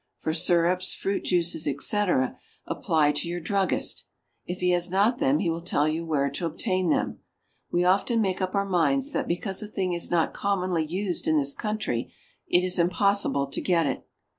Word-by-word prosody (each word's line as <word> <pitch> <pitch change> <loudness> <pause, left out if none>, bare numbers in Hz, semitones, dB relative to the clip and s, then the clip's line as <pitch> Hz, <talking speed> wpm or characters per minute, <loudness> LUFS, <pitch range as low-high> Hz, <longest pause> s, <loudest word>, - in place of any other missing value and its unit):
For 160 - -2
syrups, 175 +2 +2
fruit 195 +1 -2
juices, 170 -3 +1
etc., 145 -1 +1 0.3
apply 150 -2 +1
to 145 +3 -3
your 175 +1 -3
druggist; 190 +3 0 0.4
if 180 - -4
he 180 0 +2
has 175 0 +1
not 205 +6 +2
them 135 +2 +3
he 180 - -1
will 165 +1 -4
tell 155 -4 +1
you 160 +2 -1
where 140 -3 +1
to 165 +4 -3
obtain 185 +2 -1
them. - - 0 0.5
We 175 - +2
often 195 +6 +2
make 190 -3 0
up 185 +1 -2
our 200 0 +1
minds 260 - +1
that - - -2
because 190 +3 -2
a 210 - -5
thing 190 -4 -2
is 170 - -2
not 170 -2 +1
commonly 185 -5 -1
used 185 +2 -2
in 155 -1 +3
this 140 -1 +1
country, 210 - -3 0.4
it 175 - +3
is 185 -1 0
impossible 180 -4 +2
to - - -2
get 170 -3 +2
it. - - -3
180 Hz, 190 wpm, -26 LUFS, 160-195 Hz, 0.5 s, them